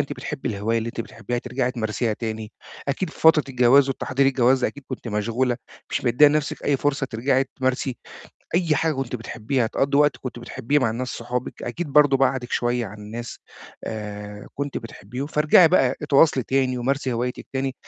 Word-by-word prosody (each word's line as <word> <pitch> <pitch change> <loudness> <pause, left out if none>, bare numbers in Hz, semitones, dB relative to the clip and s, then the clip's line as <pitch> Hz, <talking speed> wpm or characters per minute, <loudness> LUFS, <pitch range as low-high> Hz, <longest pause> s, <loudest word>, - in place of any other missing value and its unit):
أنتِ 140 - -2
بتحبّي 135 -4 -5
الهواية 110 +2 0
اللي 115 - -3
أنتِ 115 - -5
بتحبّيها 115 +1 -4
ترجعي 125 +1 -2
تمارسيها 115 -1 -1
تاني. 110 -1 -5 0.4
أكيد 160 +5 -1
في - - -15
فترة 160 -2 +6
الجواز 130 +2 +5
والتحضير 135 0 0
الجواز 130 -1 +3
أكيد 140 -1 -3
كنتِ 130 -2 -6
مشغولة. 115 +4 0 0.3
مش - - -2
مِدِّية 125 +5 +6
لنَفْسِك 150 -1 -1
أي 140 - +2
فرصة 140 0 0
ترجعي 130 +3 +1
تمارسي 130 0 -1 0.6
أي 170 -3 +2
حاجة 160 -1 +1
كنتِ 130 -3 -3
بتحبّيها، 115 +2 -2
تقضّي 140 +5 0
وقت 150 -1 +4
كنتِ 130 -2 -7
بتحبّيه 130 +4 -1
مع 120 -5 +1
الناس 125 +3 -3
صحابِك، 125 +1 -4
أكيد 140 +4 -4
برضه 145 -2 +6
بعَدِك 130 -2 0
شوية 120 -1 0
عن 105 +2 -10
الناس 115 +3 -7 0.5
آآ، 105 -1 -6
كنتِ 140 0 -3
بتحبيهم. 115 +4 -7
فارجعي 155 +3 +5
بقى 135 -7 +3
اتواصلي 145 -1 +4
تاني 130 0 0
ومارسي 135 +1 -1
هوايتِك 125 +2 -3
تاني. 135 0 -2
130 Hz, 175 wpm, -23 LUFS, 115-140 Hz, 0.6 s, فترة